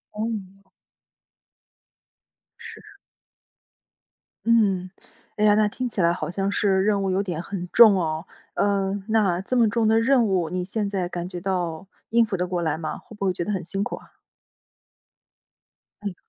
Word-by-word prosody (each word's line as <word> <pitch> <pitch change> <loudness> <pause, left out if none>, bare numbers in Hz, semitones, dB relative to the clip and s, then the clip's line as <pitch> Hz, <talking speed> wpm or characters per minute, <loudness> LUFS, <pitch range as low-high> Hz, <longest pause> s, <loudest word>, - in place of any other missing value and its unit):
嗯。 200 -3 -5 2.0
是。 460 -1 -11 1.6
嗯。 200 -6 +2 0.5
哎 210 - +1
呀， 210 - +6
那 215 0 +3
听 250 +4 -4
起 215 - -2
来 170 0 +4
好 175 - -3
像 195 +2 -1
是 195 -2 +2
任 205 -1 +2
务 195 - -1
有 195 +2 +1
点 175 -4 -4
很 180 -1 -6
重 225 -4 +8
哦。 160 -2 -2 0.3
嗯， 200 0 0
那， 210 -6 +2
这 195 +7 -3
么 235 -3 +4
重 225 +1 +1
的 220 +1 +4
任 245 0 +3
务， 185 -5 0
你 180 +1 -3
现 205 +2 -2
在 190 -3 -2
感 175 0 -5
觉 180 -2 -6
到 180 -2 -3 0.2
应 230 0 +4
付 210 - -3
得 180 -1 -1
过 180 -1 -2
来 160 -2 -1
吗？ 155 -1 -4
会 220 - -14
不 200 -1 -3
会 185 - +2
觉 175 -1 -4
得 210 - -2
很 190 -3 -2
辛 195 +4 -4
苦 - - -2
啊？ - - -16 1.9
哎 205 - -4
哟。 - - -9
195 Hz, 185 characters per minute, -24 LUFS, 180-215 Hz, 2.0 s, 重